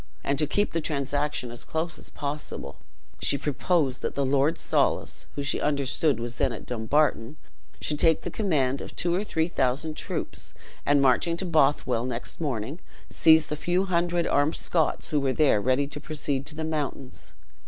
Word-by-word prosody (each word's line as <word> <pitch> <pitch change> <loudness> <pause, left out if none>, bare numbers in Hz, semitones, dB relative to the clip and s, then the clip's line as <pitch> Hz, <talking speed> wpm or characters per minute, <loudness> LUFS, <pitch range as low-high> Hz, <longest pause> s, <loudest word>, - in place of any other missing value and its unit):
And 140 0 0
to 150 - +3
keep 205 +7 +1
the 165 - -1
transaction 145 -3 -1
as 120 - -8
close 160 +1 -3
as - - -9
possible, 145 - -5 0.4
she 140 - +2
proposed 145 -1 0
that - - -3
the 140 - +1
Lord 140 +3 +2
Soulis, - - 0
who 140 - -3
she 140 - 0
understood 140 -1 +1
was 120 +1 -5
then 135 -3 +1
at - - -7
Dumbarton, 125 +2 +1 0.4
should 150 -1 -2
take 160 -2 +4
the 175 - -4
command 140 -11 +1
of - - -8
two 175 0 0
or 190 +4 +1
three 160 -6 0
thousand 150 0 0
troops, - - -4 0.3
and 140 -1 +4
marching 150 +6 +3
to 190 - -1
Bothwell 140 -7 +2
next 125 +6 -4
morning, 135 +1 -3 0.3
seize 160 -1 +6
the 150 - -2
few 175 +5 +1
hundred 175 -1 +1
armed 145 +3 +2
Scots 165 -3 +1
who 150 - +2
were 135 -2 0
there 140 -9 +3
ready 130 +5 +2
to 150 - -7
proceed 145 -3 -2
to 150 - -7
the 160 - -4
mountains. 145 -4 -4
145 Hz, 180 wpm, -26 LUFS, 135-160 Hz, 0.4 s, seize